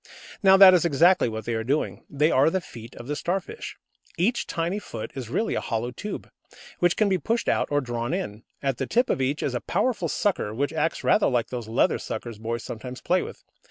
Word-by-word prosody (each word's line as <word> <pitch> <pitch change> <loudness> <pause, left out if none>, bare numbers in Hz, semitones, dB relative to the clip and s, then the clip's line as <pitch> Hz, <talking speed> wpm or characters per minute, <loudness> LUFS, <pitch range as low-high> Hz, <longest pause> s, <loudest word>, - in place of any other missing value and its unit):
Now 195 -1 +7
that 190 -1 +10
is 180 - +4
exactly 170 -1 +4
what 110 0 -6
they 120 - -2
are 110 0 -1
doing. 140 +6 -1
They 150 +3 +2
are 135 +4 +4
the 190 - 0
feet 115 -9 -11
of 120 - -9
the 145 +3 -3
Starfish. 195 - -4 0.4
Each 230 +8 +1
tiny 170 +5 -2
foot 115 - -7
is 130 -4 -6
really 220 - 0
a - - -1
hollow 120 +1 -2
tube, 205 - -6 0.5
which 175 -1 +2
can 215 - +3
be 190 -2 +1
pushed 230 +5 -1
out - - +2
or 145 0 +1
drawn 120 -1 -3
in. 115 - -3 0.2
At 135 -3 -1
the 135 - -2
tip 245 +3 +2
of - - 0
each 140 +3 0
is 135 - -1
a 125 - -2
powerful 220 +6 0
sucker, 185 - -1
which 140 +5 -1
acts 160 +1 -1
rather 215 - +4
like 120 -3 0
those 120 -3 -5
leather 110 - +2
suckers 115 -3 -6
boys 115 +1 -3
sometimes 125 +2 -7
play 180 +6 +1
with. - - -8
145 Hz, 225 wpm, -25 LUFS, 120-185 Hz, 0.5 s, that